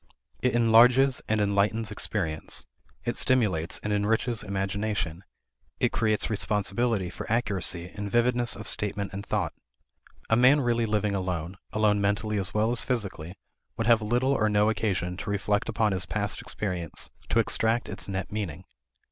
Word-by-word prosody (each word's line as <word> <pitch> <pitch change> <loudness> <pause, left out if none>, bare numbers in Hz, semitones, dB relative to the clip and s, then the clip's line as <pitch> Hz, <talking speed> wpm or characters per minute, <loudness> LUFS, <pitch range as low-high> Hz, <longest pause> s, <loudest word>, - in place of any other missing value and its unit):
It 125 - +1
enlarges 120 +3 +5
and 110 0 +2
enlightens 105 +2 +1
experience; 90 -6 -3 0.4
it - - -2
stimulates 100 -11 +1
and 105 - -1
enriches 110 +3 +1
imagination; 100 -3 -2 0.6
it - - +2
creates 110 -2 +1
responsibility 105 -1 0
for - - -7
accuracy 95 -6 0
and 105 -1 -5
vividness 120 +1 +2
of 105 0 -8
statement 100 -1 -2
and 100 +1 -5
thought. - - -1 0.7
A 110 - +3
man 130 +5 +5
really 120 -2 +1
living 105 -1 0
alone 90 -2 -3
(alone 105 -1 +2
mentally 105 +1 0
as 95 +1 +1
well 110 +2 +1
as 120 - +3
physically) 100 -8 -3 0.4
would 115 - -1
have 115 -1 +5
little 120 +5 +1
or 110 -6 +2
no 105 +1 +3
occasion 95 -5 -1
to 100 - -6
reflect 105 +2 0
upon 110 -1 +1
his 95 -2 -2
past 105 -1 -2
experience 90 -6 -5 0.2
to - - +1
extract 115 +1 +2
its 100 -2 -6
net 95 -1 -4
meaning. 95 -5 -4
105 Hz, 155 wpm, -27 LUFS, 95-115 Hz, 0.7 s, enlarges